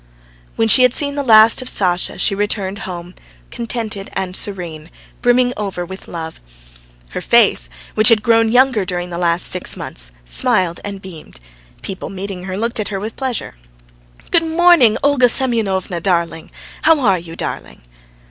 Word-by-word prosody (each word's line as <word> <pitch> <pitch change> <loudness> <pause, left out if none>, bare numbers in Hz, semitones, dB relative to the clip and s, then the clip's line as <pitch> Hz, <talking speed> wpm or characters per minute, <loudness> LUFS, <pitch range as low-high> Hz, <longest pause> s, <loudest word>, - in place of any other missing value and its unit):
When 225 - +1
she 255 - +7
had 250 -1 +4
seen 285 -1 0
the 285 - -2
last 225 -2 +6
of 255 - -4
Sasha, 180 -2 -1
she - - +2
returned 205 -1 -2
home, 175 0 -8 0.4
contented 225 -4 -5
and 185 -1 -3
serene, 170 -6 -3 0.3
brimming 245 0 +3
over 195 -4 -4
with 190 +2 -10
love; 160 -1 -7 0.7
her - - -5
face, - - +3 0.2
which 215 +1 +5
had 220 -2 +3
grown 225 -1 +3
younger 250 -3 +3
during 180 -1 -4
the 170 - -4
last 170 0 +2
six 180 - -1
months, - - -3 0.2
smiled 165 - 0
and 200 -1 -7
beamed; 165 - -12 0.4
people 190 - -6
meeting 195 -1 -7
her 190 0 -5
looked 230 +2 -2
at 215 - -2
her 195 -2 -4
with 215 +3 -6
pleasure. 260 -4 -4 0.8
"Good 340 - +5
morning, 325 -7 +4
Olga 275 -3 +4
Semyonovna, 205 -9 0
darling. 170 -3 -1 0.3
How 320 -1 +4
are 195 -7 +2
you, 165 -1 -10
darling?" 60 - -7
200 Hz, 160 wpm, -17 LUFS, 180-235 Hz, 0.8 s, she